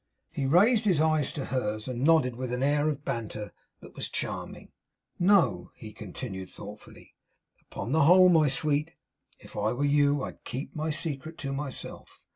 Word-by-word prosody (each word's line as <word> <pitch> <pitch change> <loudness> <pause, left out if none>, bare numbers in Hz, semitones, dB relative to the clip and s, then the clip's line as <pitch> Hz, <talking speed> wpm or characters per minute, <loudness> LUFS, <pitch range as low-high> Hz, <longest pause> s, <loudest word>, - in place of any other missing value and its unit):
He 135 - -2
raised 210 - +4
his 180 -7 +3
eyes 155 -2 +2
to 140 - -4
hers; 110 -4 -2
and 125 -1 -4
nodded 150 -6 +4
with 125 0 -4
an 125 +1 -1
air 145 +2 +2
of 145 -1 -4
banter 105 -2 -4 0.3
that - - -13
was - - -5
charming. - - -5 0.5
'No,' 175 - +3
he 110 -1 -10
continued, 95 -2 -7
thoughtfully. 105 +1 -12 0.5
'Upon 120 - -6
the 155 -1 +4
whole, 185 +3 +8
my 160 -4 +5
sweet, 150 +3 0 0.4
if - - -16
I 105 +2 0
were 140 +4 -1
you 145 -1 +3
I'd - - -8
keep 130 +4 -6
my 155 +1 -2
secret 155 0 -4
to 135 - -2
myself. 140 -1 -7
140 Hz, 170 wpm, -28 LUFS, 120-155 Hz, 0.5 s, whole